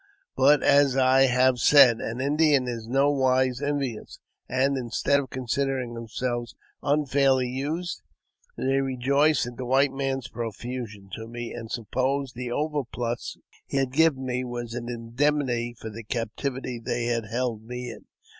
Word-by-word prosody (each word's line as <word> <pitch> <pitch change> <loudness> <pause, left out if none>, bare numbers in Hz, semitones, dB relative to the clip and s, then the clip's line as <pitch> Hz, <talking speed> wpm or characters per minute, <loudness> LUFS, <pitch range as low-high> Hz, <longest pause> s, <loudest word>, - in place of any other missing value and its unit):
But, 140 +2 +5
as 140 -2 +4
I 135 +1 +5
have 125 0 +3
said, 125 -2 +7
an 115 +2 -4
Indian 145 -1 +3
is 115 -2 -5
in 120 - -6
no 140 +2 +4
wise 130 -1 +2
envious, 140 -5 -3 0.3
and, 135 +2 +2
instead 130 +3 +1
of 135 -2 -5
considering 130 -1 -2
themselves 120 +1 -4 0.3
unfairly 140 -3 +2
used, 150 +8 -3 0.6
they 135 +1 +1
rejoiced 135 +3 +2
at 120 -1 -8
the 130 - -4
white 135 +2 +3
man's 135 -1 -2
profusion 115 -3 -6
to 110 0 -6
me, 120 0 -6
and 115 -2 -7
supposed 130 +4 -1
the 125 0 -5
overplus 125 -5 -3 0.3
he - - -2
had 135 -2 0
given 150 -3 +3
me 125 0 -1
was 120 -2 -5
an 120 0 -5
indemnity 120 0 -1
for 110 - -7
the 115 +2 -8
captivity 125 +3 -3
they 120 0 -1
had 115 -2 -1
held 120 0 -2
me 125 +1 -6
in. - - -12
130 Hz, 155 wpm, -26 LUFS, 120-135 Hz, 0.6 s, said